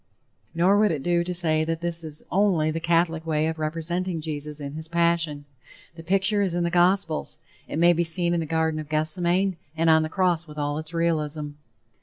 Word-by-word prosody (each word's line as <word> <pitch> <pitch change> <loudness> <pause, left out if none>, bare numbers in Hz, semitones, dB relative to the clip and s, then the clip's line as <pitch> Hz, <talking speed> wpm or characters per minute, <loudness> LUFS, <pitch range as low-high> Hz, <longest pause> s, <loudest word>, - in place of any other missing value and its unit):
Nor 185 +5 +3
would 210 0 +3
it 145 -4 -3
do 175 0 +1
to 180 - -5
say 160 -3 +3
that 165 +1 -3
this 170 -1 0
is 155 -1 -2
only 180 -5 +2
the 165 - -3
Catholic 165 -1 0
way 155 -1 0
of 160 0 -3
representing 165 +3 -2
Jesus 150 -1 -5
in 140 -1 -7
his 160 +1 -5
passion. 170 -3 0 0.5
The 165 - -11
picture 195 +4 +2
is 185 -4 -1
in 175 - 0
the 170 - -1
gospels, 175 -2 +1 0.3
it - - -5
may 170 +1 +5
be 170 +1 0
seen 170 +1 +5
in 170 - 0
the 160 - -4
Garden 160 0 -1
of 155 -1 -8
Gethsemane 175 +4 0 0.2
and 165 0 +3
on 160 0 +5
the 155 - -3
cross 175 -1 0
with 150 0 -12
all 145 0 -2
its 155 0 -5
realism. 155 -3 -1
165 Hz, 210 wpm, -24 LUFS, 155-175 Hz, 0.5 s, may